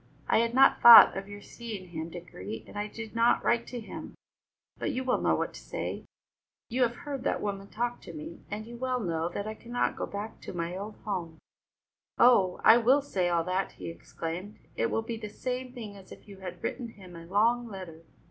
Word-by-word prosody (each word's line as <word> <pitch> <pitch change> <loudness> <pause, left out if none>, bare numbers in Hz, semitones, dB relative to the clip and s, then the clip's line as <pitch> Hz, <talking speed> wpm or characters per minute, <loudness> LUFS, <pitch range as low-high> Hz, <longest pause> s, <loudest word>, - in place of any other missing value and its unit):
I - - +4
had 235 +1 +1
not 270 +1 +6
thought 235 -1 +11
of 195 0 -5
your 205 0 -9
seeing 215 -6 -8
him, 160 -1 -5
Dickory, 110 - -8
and - - -14
I 205 0 -2
did 220 0 -8
not 230 +1 +3
write 235 0 +2
to 245 - -5
him, 220 - -8 0.6
but - - -1
you 260 - -2
will 255 -1 +1
know - - +3
what - - -2
to - - -9
say. - - -5 0.6
You 255 +2 -1
have 240 -1 +3
heard 280 -3 -4
that - - 0
woman 200 -1 -4
talk 240 +3 -3
of - - -8
me, 310 +2 -8
and 210 +1 -5
you 235 +1 -9
well 255 0 -1
know 170 -4 -2
I 215 +2 -3
cannot 240 +2 -2
go - - -3
back 205 +2 -6
to - - -7
my 170 0 -3
old 205 +3 -6
home." 175 -6 -3 0.8
"Oh, 200 -7 +5
I 225 - +9
will 260 +5 +4
say 185 -10 0
all 170 -1 +2
that!" 185 +2 -1
he - - -7
exclaimed. 170 +4 -6 0.2
"It 115 - +1
will 225 - -1
be 230 0 -4
the 215 -1 -6
same 250 +3 -4
thing 225 -5 -8
as 195 -1 -14
if - - -13
you 200 -1 -11
had 180 -2 -8
written 250 -3 -3
him 190 -5 -13
a 165 0 -10
long 230 +5 +2
letter. 185 -6 -9
210 Hz, 215 wpm, -29 LUFS, 185-235 Hz, 0.8 s, thought